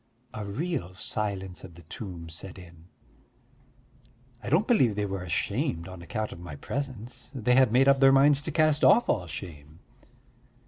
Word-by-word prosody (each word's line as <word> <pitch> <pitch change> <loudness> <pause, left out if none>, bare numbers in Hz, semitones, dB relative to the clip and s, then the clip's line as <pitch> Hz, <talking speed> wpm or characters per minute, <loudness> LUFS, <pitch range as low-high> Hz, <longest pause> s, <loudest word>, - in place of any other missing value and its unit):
A 105 - -5
real 110 - -3
silence 95 -2 -4
of 90 -3 -11
the 85 - -14
tomb 85 0 -8
set 90 +4 -9
in. 85 -3 -14 1.6
I 105 - -6
don't 165 - +3
believe 130 - +3
they 105 0 -1
were 95 -1 -4
ashamed 85 -1 -2
on 95 -2 -10
account 105 +6 -4
of - - -9
my 85 -4 -8
presence: 130 - -6
they 125 -1 +1
had 130 -3 +5
made 130 +3 +4
up 140 0 +5
their 135 0 +7
minds 140 +1 +5
to 160 - -5
cast 155 -1 +2
off 240 - +5
all 90 - 0
shame! 75 -2 -9
100 Hz, 170 wpm, -27 LUFS, 85-135 Hz, 1.6 s, their